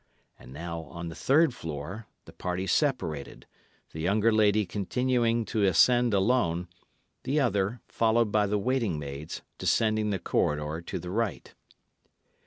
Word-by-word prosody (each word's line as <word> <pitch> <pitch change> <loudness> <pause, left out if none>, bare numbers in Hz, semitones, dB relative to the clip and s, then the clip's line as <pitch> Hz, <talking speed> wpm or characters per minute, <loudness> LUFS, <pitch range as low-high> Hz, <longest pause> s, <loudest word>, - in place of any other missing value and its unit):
And - - -13
now, 85 +3 -5
on 85 +1 -7
the 80 - -8
third 150 - +3
floor, 80 +5 -6 0.2
the - - -13
party 90 +1 -3
separated, 95 - -1 0.5
the 80 - -8
younger 105 +6 +2
lady 105 -1 +3
continuing 115 +3 0
to 110 - -1
ascend 120 +6 +4
alone, 95 -4 +1 0.5
the 140 +4 0
other, 105 -3 0
followed 115 -1 +2
by 105 -1 +2
the 105 +1 0
waiting 115 -5 0
maids, 70 +1 -6 0.2
descending 110 -1 +1
the 100 - 0
corridor 75 -1 -1
to - - -3
the 90 - -6
right. 115 +1 -2
105 Hz, 140 wpm, -28 LUFS, 85-115 Hz, 0.5 s, ascend